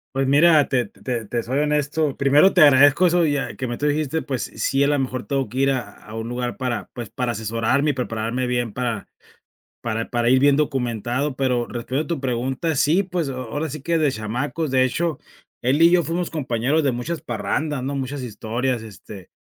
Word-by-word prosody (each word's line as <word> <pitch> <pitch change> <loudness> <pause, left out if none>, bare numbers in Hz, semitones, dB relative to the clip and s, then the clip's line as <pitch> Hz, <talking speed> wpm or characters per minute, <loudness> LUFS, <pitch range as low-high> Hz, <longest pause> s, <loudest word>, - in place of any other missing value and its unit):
Pues 135 0 +1
mira, 150 +1 +5
te 125 -3 +1
te 120 +2 -5
te 120 +3 -2
soy 125 +4 -3
honesto, 150 0 0
primero 145 +7 +4
te 180 - +4
agradezco 145 +4 +6
eso 175 0 +3
ya 140 -5 -1
que 130 - -4
me 120 -1 -4
tú 150 - +1
dijiste, 155 +1 0
pues 130 -4 -3
s - - -15
sí, 135 +1 +2
a 140 - +3
lo 145 -1 +2
mejor 130 -1 -3
tengo 135 -2 -1
que 125 - -8
ir 135 +1 +3
a 130 -3 -2 0.2
a 110 - -11
un 115 +1 -5
lugar 120 0 -3
para, 125 -3 -3
pues, 120 -4 -7
para 125 -2 -2
asesorarme 115 +6 0
y - - -5
prepararme 120 0 -2
bien 120 -3 -1
para 120 -3 -3 0.7
para 115 -1 -3
para 120 -1 +1
ir 130 +1 +5
bien 140 +1 +5
documentado, 130 -1 -1
pero 125 -3 0
respondiendo 130 +7 -3
a - - -1
tu - - -10
pregunta, 130 +5 -1
sí, 165 +8 +3
pues, 180 -4 -2
a 135 - -3
ahora 130 +5 -4
sí 145 0 -7
que 170 +3 0
de 155 -3 +3
chamacos, 130 +7 -3
de 130 -1 +4
hecho, 160 +3 -1 0.4
él 135 +6 +2
y 170 - +7
yo 175 -1 +4
fuimos 170 +2 -2
compañeros 135 0 0
de 135 -4 +1
muchas 155 +8 -3
parrandas, 130 +5 -2
¿no?, 140 +2 -3
muchas 135 +1 -4
historias, 120 +1 -3
este, 100 -3 -11
130 Hz, 215 wpm, -22 LUFS, 120-150 Hz, 0.7 s, y